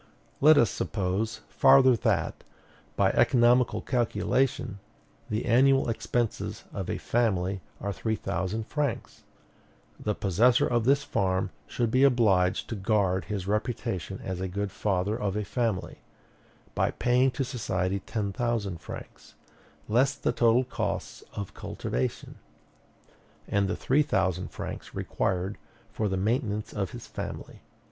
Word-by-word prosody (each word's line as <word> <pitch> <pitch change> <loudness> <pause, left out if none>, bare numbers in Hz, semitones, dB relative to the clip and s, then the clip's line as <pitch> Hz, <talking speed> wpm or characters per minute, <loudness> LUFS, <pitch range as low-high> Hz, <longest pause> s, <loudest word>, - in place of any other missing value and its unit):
Let 155 +2 +7
us 110 -6 +4
suppose 105 +4 -2
farther 135 -2 +6
that, 115 - 0 0.5
by - - +3
economical 120 0 +4
calculation, 120 -3 0 0.5
the 110 0 -1
annual 135 +2 +4
expenses 115 0 -2
of - - -4
a - - -1
family 95 -5 0 0.2
are 100 0 -3
three 110 +6 -1
thousand 95 +4 -3
francs: 145 -4 -3 0.8
the 105 -1 -1
possessor 110 +6 +3
of 120 -2 +1
this 140 +2 +4
farm 95 -6 0 0.2
should 120 -2 -1
be 130 - +3
obliged 105 -9 +3
to 115 - -3
guard 95 -2 +1
his 100 -4 -4
reputation 100 -3 -2
as 95 -1 -4
a 95 - -1
good 100 +2 -3
father 100 0 0
of 105 -3 -2
a 105 -1 -2
family, 115 -4 -2 0.7
by - - +1
paying 125 +2 +2
to 135 - +1
society 100 -7 -2
ten 100 -1 -3
thousand 115 -7 -1
francs, - - -10 0.5
less 130 +6 +3
the - - 0
total 120 +1 +3
costs 125 - -4
of 100 -2 -5
cultivation, 65 +1 -4 1.1
and 100 -1 +1
the - - -1
three 140 +4 +2
thousand 95 - 0
francs - - -7
required 95 +2 -2 0.3
for 105 -2 -1
the 95 - -1
maintenance 110 +1 -1
of 100 -3 -2
his - - -9
family. - - -7
105 Hz, 135 wpm, -28 LUFS, 95-120 Hz, 1.1 s, Let